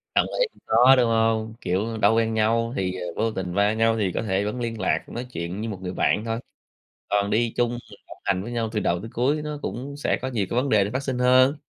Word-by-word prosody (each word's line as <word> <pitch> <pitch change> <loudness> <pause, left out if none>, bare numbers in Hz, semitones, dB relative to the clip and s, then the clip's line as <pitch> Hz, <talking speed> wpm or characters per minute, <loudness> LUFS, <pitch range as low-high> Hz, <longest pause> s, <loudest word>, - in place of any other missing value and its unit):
Đồng - - +4
ý, - - +4
cũng - - -24
khó, 125 +4 +6
đúng 125 -2 +3
hông? 115 -1 +1
Kiểu, 105 +5 -1
đâu 110 +1 +4
quen 115 0 +1
nhau, 115 +2 +1
thì 95 -6 -1 0.2
vô 115 0 0
tình 90 -3 -4
va 100 +2 +3
nhau 115 0 +2
thì 100 -4 0
có - - -2
thể 100 -1 0
vẫn 105 +4 -3
liên 115 -2 -3
lạc, - - +1
nói 120 +2 -5
chuyện 85 +5 -4
như 115 - -3
một 95 -3 -6
người 90 0 -4
bạn 105 - +1
thôi. 115 0 -2 0.7
Còn 100 0 +1
đi 115 +2 +1
chung 120 -1 +2
du 120 - -4
lịch - - -14
đồng - - -11
hành 95 -1 0
với 120 - -6
nhau 115 -2 -1
từ 110 - -1
đầu 85 -3 0
tới 110 - -8
cuối 140 +6 +1
nó 150 -1 -5
cũng 140 +4 -5
sẽ 145 - 0
có - - -2
nhiều 115 -6 -1
cái 120 - -2
vấn 140 - -2
đề 105 -4 +4
để 100 - -3
phát 130 +3 -2
sinh 130 -3 -2
hơn. 130 +3 +5
115 Hz, 270 wpm, -24 LUFS, 105-120 Hz, 0.7 s, khó